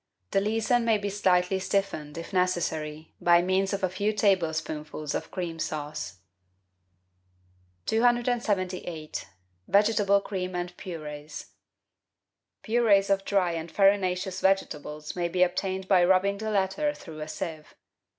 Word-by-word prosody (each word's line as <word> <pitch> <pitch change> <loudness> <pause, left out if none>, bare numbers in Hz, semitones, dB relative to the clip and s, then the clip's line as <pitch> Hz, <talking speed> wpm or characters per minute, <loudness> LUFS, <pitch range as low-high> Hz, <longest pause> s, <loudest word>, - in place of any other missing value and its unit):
The 195 - +3
leason 225 +3 +1
may 225 -2 +3
be 205 0 -3
slightly 190 -1 +2
stiffened, 190 -6 -2
if 165 - -7
necessary, 160 -4 -1
by 175 0 +5
means 190 +1 +1
of 200 -1 -3
a - - +4
few 205 +4 -1
tablespoonfuls 160 -7 0
of - - -3
cream 170 -3 -4
sauce. 150 - -4 1.6
278— 215 -9 0 0.4
VEGETABLE 200 0 +4
CREAMS 185 -2 -4
AND 175 0 -4
PUREES 150 -5 -8 1.1
Purees 215 -4 +3
of 195 0 +2
dry 190 -3 +2
and 165 0 -5
farinaceous 190 -2 +2
vegetables 150 -5 -1
may 175 -1 0
be 180 +1 +2
obtained 190 +1 -1
by 185 -3 +5
rubbing 190 +2 +3
the 220 0 -3
latter 215 +9 0
through 160 -3 -10
a 155 - -5
sieve. 155 0 -6
185 Hz, 125 wpm, -27 LUFS, 165-200 Hz, 1.6 s, by